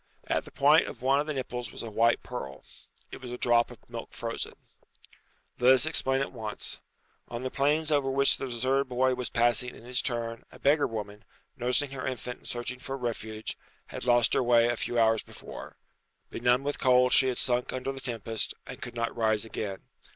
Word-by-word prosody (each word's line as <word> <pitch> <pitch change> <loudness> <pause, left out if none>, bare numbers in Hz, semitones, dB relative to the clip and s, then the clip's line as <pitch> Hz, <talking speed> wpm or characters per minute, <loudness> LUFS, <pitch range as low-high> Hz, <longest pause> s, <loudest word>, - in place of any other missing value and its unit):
At - - 0
the - - -12
point - - +5
of - - -9
one 135 +2 +4
of 150 - -1
the 155 - -1
nipples 125 -3 -4
was - - -6
a 115 - -6
white 115 +2 +3
pearl. 70 - -7 0.5
It - - -9
was 125 -1 -7
a 125 - -4
drop 120 -1 +3
of - - -15
milk - - -8
frozen. - - -4 1.1
Let 125 +2 +7
us 130 - +2
explain 135 -4 +2
at 135 - -2
once. 110 -4 -4 0.5
On 120 +1 -5
the 130 - -3
plains 150 +3 +1
over 145 -2 +2
which 140 +1 +3
the 135 - -4
deserted 130 +3 0
boy 130 +1 +2
was 125 -1 -3
passing 120 +1 +2
in - - -14
his 125 +1 +1
turn 115 -2 -3
a - - -13
beggar 145 +1 +3
woman, 105 -1 -6 0.3
nursing 125 +3 +1
her 130 -1 -4
infant 125 -1 -4
and - - -14
searching 120 +1 -4
for 135 +1 -5
a - - -5
refuge, 110 -3 -4 0.3
had - - -6
lost 120 -1 +4
her - - +3
way 120 -1 +5
a 120 - +1
few 120 +1 -3
hours 110 -1 +4
before. - - -10 0.5
Benumbed 125 +3 +2
with 145 - -2
cold 125 -1 +5
she 130 - +6
had 125 - -1
sunk 125 0 +2
under 130 +1 -3
the 135 0 -7
tempest, 115 -3 -3
and - - -9
could 120 -1 -7
not 115 0 -2
rise 110 -2 +1
again. 100 -3 -5
125 Hz, 210 wpm, -29 LUFS, 115-130 Hz, 1.1 s, Let